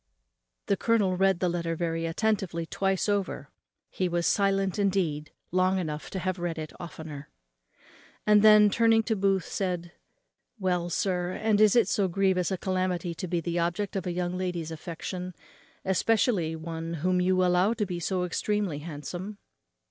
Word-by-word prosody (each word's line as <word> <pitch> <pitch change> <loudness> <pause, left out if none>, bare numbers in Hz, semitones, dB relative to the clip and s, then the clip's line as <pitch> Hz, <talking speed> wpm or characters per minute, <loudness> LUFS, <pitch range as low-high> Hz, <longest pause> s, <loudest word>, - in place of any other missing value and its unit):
The 200 - +2
colonel 205 -4 +2
read 190 -1 +2
the 180 - +2
letter 170 -1 -1
very 165 0 -2
attentively 185 -2 -1
twice 195 +3 0
over 205 -2 -2 0.4
(he 185 -1 -2
was 170 0 0
silent 195 -1 +1
indeed 175 -7 0 0.2
long 185 +1 +2
enough 155 -4 -4
to - - -5
have 185 0 -2
read 175 -1 -3
it 155 -1 -6
oftener); 155 -4 -8 1.0
and 210 -1 +6
then, 210 -1 +7
turning 225 0 +4
to 220 0 0
Booth, 195 -2 +1
said, 180 -3 -3 0.7
"Well, 180 -3 0
sir, 180 0 -1
and 215 0 +1
is 215 0 +6
it 235 - +5
so 200 -3 +1
grievous 185 0 +1
a 190 - -1
calamity 185 -2 -1
to 180 - -5
be 175 -1 -1
the 170 +1 -2
object 175 +4 -1
of 190 -1 -2
a - - -1
young 175 0 -2
lady's 175 -3 -3
affection; 175 +2 -6 0.5
especially 190 -3 +2
of 160 - -7
one 165 0 -4
whom 180 0 +3
you 185 0 +3
allow 180 +4 +3
to 220 -3 -1
be 180 -2 -4
so 180 +2 -1
extremely 190 -2 -1
handsome?" 175 +6 -6
185 Hz, 165 wpm, -28 LUFS, 170-195 Hz, 1.0 s, then